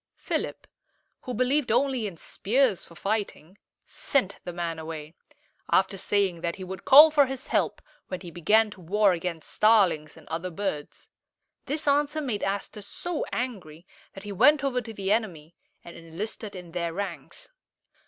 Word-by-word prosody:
Philip, - - -3 0.6
who 250 - -4
believed 255 +1 +1
only 250 -2 +1
in 180 -4 -8
spears 230 - +1
for 170 - -16
fighting, 200 -2 -3 0.3
sent 225 -9 -1
the 175 - -5
man 170 -1 -3
away, 160 -1 -7 0.6
after 190 +1 +3
saying 190 -3 0
that 170 0 -2
he 190 - -8
would 185 0 -8
call 295 +3 +10
for 290 -3 +4
his 265 0 -5
help - - 0 0.2
when 185 - -5
he 175 -3 -9
began 210 +7 +3
to 190 - -12
war 200 +4 +3
against 170 -1 -5
starlings 190 -9 +3
and 160 - -16
other 165 +3 -3
birds. 165 -5 -5 0.6
This 300 +2 -3
answer 290 +2 +2
made 245 -9 -2
Aster 200 +1 -3
so 335 - -4
angry 185 -10 -5 0.3
that 195 - -10
he 205 - -6
went 275 +9 +5
over 255 -2 0
to 225 - -8
the 200 -2 -3
enemy 175 -8 -1 0.3
and 170 - -11
enlisted 200 +5 -7
in 180 -2 -9
their 170 -1 -2
ranks. 200 - -6
200 Hz, 165 wpm, -27 LUFS, 170-250 Hz, 0.6 s, call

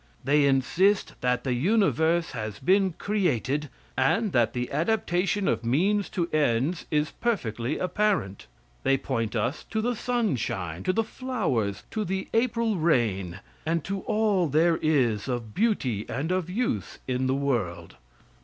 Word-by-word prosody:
They 145 +1 +4
insist 170 +9 +2
that 125 0 +1
the 130 - 0
universe 170 - +2
has 110 -5 -5
been 190 +4 +2
created, 150 - -1 0.3
and 190 - +2
that 120 -5 +2
the 125 0 -3
adaptation 195 +3 0
of - - 0
means 185 - +1
to 170 -2 +1
ends 145 +3 +1
is 150 0 +1
perfectly 130 - -2
apparent. 185 - -1 0.3
They 135 - +3
point 115 -4 -2
us 120 +7 -1
to 220 - -3
the 240 +2 0
sunshine, 120 - -1
to - - +3
the 225 - +2
flowers, 175 - -2
to 215 -1 -1
the 190 0 -3
April 230 -2 +1
rain, 105 - +1 0.2
and 165 0 0
to 195 +4 -3
all 210 -5 +2
there 160 +3 +3
is 125 -9 +1
of 120 -4 -3
beauty 130 - 0
and 155 +6 -2
of 185 -2 -1
use 185 - -2
in 130 0 0
the 130 - +1
world. 105 -12 -2
155 Hz, 145 wpm, -26 LUFS, 120-200 Hz, 0.3 s, They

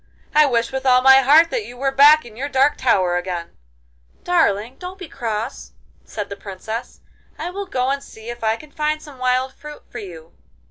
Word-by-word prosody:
I 300 0 +6
wish 235 -3 0
with 265 0 -4
all 255 -1 +4
my 265 0 +8
heart 295 +5 +5
that - - -1
you 245 -10 -11
were 270 +1 0
back 290 +2 +6
in 225 -3 -13
your 275 +5 -4
dark 275 +1 +3
tower 185 -8 +2
again.' 175 -2 -5 0.7
'Darling, 250 - +1
don't 365 +1 -8
be 370 -3 -9
cross,' 230 -2 -5 0.3
said 210 -2 -6
the 200 - -7
Princess. 210 +4 -7 0.4
'I 340 +3 -5
will 400 +1 -6
go 255 -6 -1
and 280 0 -2
see 220 +1 -13
if 240 -1 -8
I 220 0 +2
can 300 +5 -14
find 305 +1 -1
some 290 -4 -13
wild 255 +1 0
fruit 300 0 -11
for - - -6
you. 165 -5 -11
260 Hz, 200 wpm, -20 LUFS, 220-300 Hz, 0.7 s, my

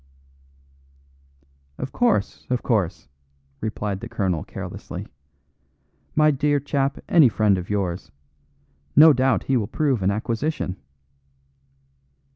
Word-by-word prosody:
"Of 130 0 -5
course, 235 - 0
of 125 -1 -1
course," 100 -8 -1 0.5
replied 105 -2 -3
the - - -8
colonel 90 -5 -1
carelessly - - -7 1.1
"My 155 0 +5
dear 145 +1 +1
chap, 140 -1 -1
any 155 -7 +6
friend 105 0 +2
of 90 -1 -5
yours. 95 -4 -2 0.8
No 155 +2 +9
doubt 130 -1 +2
he 135 - +1
will 105 -4 -1
prove 135 -5 0
an 95 - +2
acquisition." 110 0 -2
120 Hz, 105 wpm, -23 LUFS, 100-145 Hz, 1.1 s, No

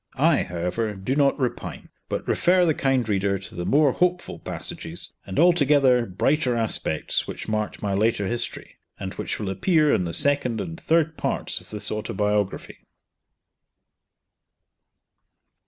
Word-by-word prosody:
I, 155 +2 +4
however, 90 +5 -2
do 95 +8 -2
not 140 -1 +3
repine, 125 -3 -4 0.2
but - - -3
refer 180 +1 +3
the 160 - +3
kind 135 -4 +1
reader 100 -1 +1
to 95 +4 -10
the 90 -3 -4
more 145 +6 +4
hopeful 180 +4 -1
passages, 80 +1 -4
and 95 - -5
altogether 140 -7 +4
brighter 125 - +1
aspects 110 -8 -1
which - - -6
marked 110 -1 -2
my 100 -1 0
later 105 0 +1
history, 120 +4 -4 0.2
and - - -5
which - - -4
will 100 -3 -3
appear 155 - +3
in 90 - +1
the 85 - -3
second 135 - +1
and 165 -1 -6
third 160 -1 +1
parts - - -1
of - - -18
this 105 -1 -1
autobiography. 105 -2 -2
115 Hz, 140 wpm, -24 LUFS, 100-150 Hz, 0.2 s, I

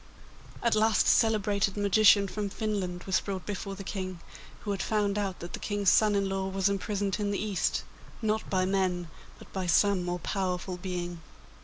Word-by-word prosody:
At 235 - +3
last 215 0 +3
a - - +4
celebrated 205 -2 +2
magician 205 0 +5
from 205 +1 -3
Finland 195 -5 -3
was 190 - +1
brought 190 -2 -5
before 200 -1 -4
the 195 - -7
King, 185 -2 -5 0.4
who 205 - -3
had 195 - -2
found 205 -2 0
out 200 -3 -2
that 175 - -7
the - - -4
King's 205 -2 +2
son 215 -1 +4
in 200 -1 +1
law 195 0 -2
was 195 0 +1
imprisoned 200 0 -1
in 205 -1 0
the 200 - -1
East, 205 -3 -1 0.4
not 220 -1 -1
by 185 -1 +2
men, 185 -3 0 0.3
but - - -15
by 190 -2 -2
some 200 +2 +4
more 175 0 -2
powerful 185 -1 -2
being. 175 -2 -4
195 Hz, 185 wpm, -29 LUFS, 185-205 Hz, 0.4 s, magician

